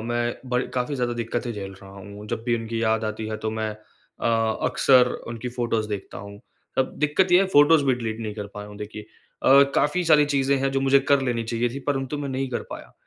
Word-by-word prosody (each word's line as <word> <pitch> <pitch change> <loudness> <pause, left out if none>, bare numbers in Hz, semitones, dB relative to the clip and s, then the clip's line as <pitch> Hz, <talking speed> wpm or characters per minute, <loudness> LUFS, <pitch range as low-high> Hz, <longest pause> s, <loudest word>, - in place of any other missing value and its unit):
मैं 120 0 -1
ब 125 0 +2
काफ़ी 125 +3 -1
ज़्यादा 125 -2 -1
दिक्कतें 120 +1 -3
झेल 100 -2 -6
रहा 95 - -12
हूँ। 100 +1 -11
जब 110 - -4
भी 120 -1 +1
उनकी 115 0 -4
याद 110 -1 +1
आती 110 0 -4
है 110 - -3
तो - - 0
मैं 110 0 -2 0.5
अ, - - -1 0.4
अक्सर 125 -2 +5 0.2
उनकी 115 +1 -5
फ़ोटोस 120 -3 -1
देखता 105 -2 -6
हूँ। 100 0 -10 0.4
अब 130 - +1
दिक्कत 155 +5 +2
ये 180 - +7
है 195 - +2
फ़ोटोस 145 +2 +6
भी 130 - +3
डिलीट 115 -2 -4
नहीं 110 -2 -4
कर 105 -2 -5
पाया 105 0 -7
हूँ 105 - -11
देखिए। 105 0 -7
अ, 135 +5 +2
काफ़ी 150 +5 +2
सारी 155 -3 +5
चीज़ें 135 0 +2
हैं 135 +1 0
जो 135 - 0
मुझे 135 0 +5
कर 140 -1 +5
लेनी 120 -3 -1
चाहिए 115 +1 -1
थी 135 - -6
परंतु 135 +1 -1
मैं 145 -1 -4
नहीं 135 0 -2
कर 120 - -3
पाया। - - -9
120 Hz, 230 wpm, -24 LUFS, 110-135 Hz, 0.5 s, ये